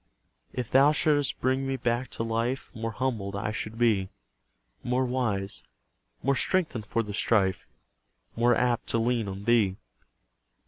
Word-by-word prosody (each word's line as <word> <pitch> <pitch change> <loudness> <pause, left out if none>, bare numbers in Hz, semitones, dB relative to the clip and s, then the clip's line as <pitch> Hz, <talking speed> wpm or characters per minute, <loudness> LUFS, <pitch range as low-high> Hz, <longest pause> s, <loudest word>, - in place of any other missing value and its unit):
If 125 -3 -4
Thou 140 +3 +6
shouldst 145 -2 +1
bring 130 +1 +1
me 135 0 -1
back 120 +1 -1
to - - -1
life, 115 +3 -2
More 115 0 -3
humbled 115 -4 -2
I 105 +1 -2
should 110 +1 -5
be; 110 -5 +2 0.7
More 125 +1 0
wise 110 -6 -1 0.6
more 140 +1 +2
strengthened 135 - 0
for 115 - 0
the 105 -1 -6
strife 100 -3 +1 0.7
More 120 +1 +4
apt 120 0 +1
to - - +1
lean 115 -1 +1
on 100 0 -6
Thee. 105 -4 +3
120 Hz, 145 wpm, -28 LUFS, 105-130 Hz, 0.7 s, Thou